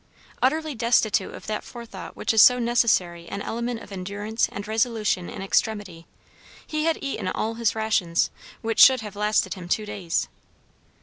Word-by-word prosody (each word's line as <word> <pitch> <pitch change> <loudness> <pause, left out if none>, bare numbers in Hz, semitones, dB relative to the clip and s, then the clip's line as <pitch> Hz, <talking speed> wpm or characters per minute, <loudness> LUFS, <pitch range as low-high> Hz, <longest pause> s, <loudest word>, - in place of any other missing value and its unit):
Utterly 310 +3 +1
destitute 225 -4 +2
of - - -11
that 215 0 -3
forethought 235 -2 -9
which - - -1
is 220 - +6
so 250 +2 +8
necessary 215 -8 +1
an 200 - -5
element 235 0 -3
of - - -13
endurance 205 +4 -2
and 200 +1 -6
resolution 220 -5 0
in - - -6
extremity, 195 -4 -1 0.6
he 310 0 -2
had 330 -1 +2
eaten 275 -8 -3
all 220 +4 -2
his 230 -1 0
rations, 205 -6 +1 0.3
which 225 0 -1
should 260 -2 +8
have 210 -2 -8
lasted 210 +1 +1
him 180 -3 -9
two 215 +3 0
days. 200 -5 -2
220 Hz, 165 wpm, -24 LUFS, 200-235 Hz, 0.6 s, so